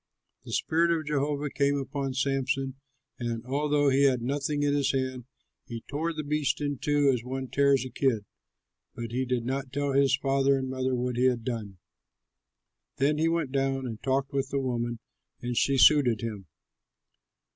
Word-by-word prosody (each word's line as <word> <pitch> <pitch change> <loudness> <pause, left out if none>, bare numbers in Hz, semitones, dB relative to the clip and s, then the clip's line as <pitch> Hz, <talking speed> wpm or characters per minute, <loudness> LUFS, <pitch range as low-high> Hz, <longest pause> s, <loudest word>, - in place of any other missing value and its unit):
The - - -8
spirit 165 +2 +2
of 165 -2 0
Jehovah 145 0 -1
came 140 +1 +1
upon 135 -1 -3
Samson 135 -1 0 0.5
and, 120 -1 -3
although 145 +2 +2
he 135 +1 +4
had 125 -3 +2
nothing 145 +3 -1
in 145 0 +2
his 140 -1 +1
hand, 130 -2 -2 0.4
he 115 -1 -6
tore 155 +4 -2
the 155 -1 -4
beast 150 -3 0
in 145 -3 -2
two 145 -1 +3
as 120 -2 -2
one 130 +1 -4
tears 140 -2 +3
a 130 - -7
kid. 120 -7 0 0.7
But 115 -1 -5
he 130 +2 -1
did 125 -2 -1
not 135 +1 -3
tell 140 0 -1
his 140 0 +4
father 135 0 +2
and 130 -1 -3
mother 130 0 -1
what 125 0 -2
he 125 - +3
had 125 -3 +2
done. 110 -6 -4 1.2
Then 150 +3 +2
he 160 - +3
went 165 -5 -1
down 135 -1 0
and 115 -3 -6
talked 135 +1 0
with 135 -1 -1
the 140 - -1
woman, 120 -2 -2 0.4
and 120 0 -3
she 135 +3 +2
suited 130 -5 +5
him. 105 -5 -5
135 Hz, 180 wpm, -28 LUFS, 125-145 Hz, 1.2 s, suited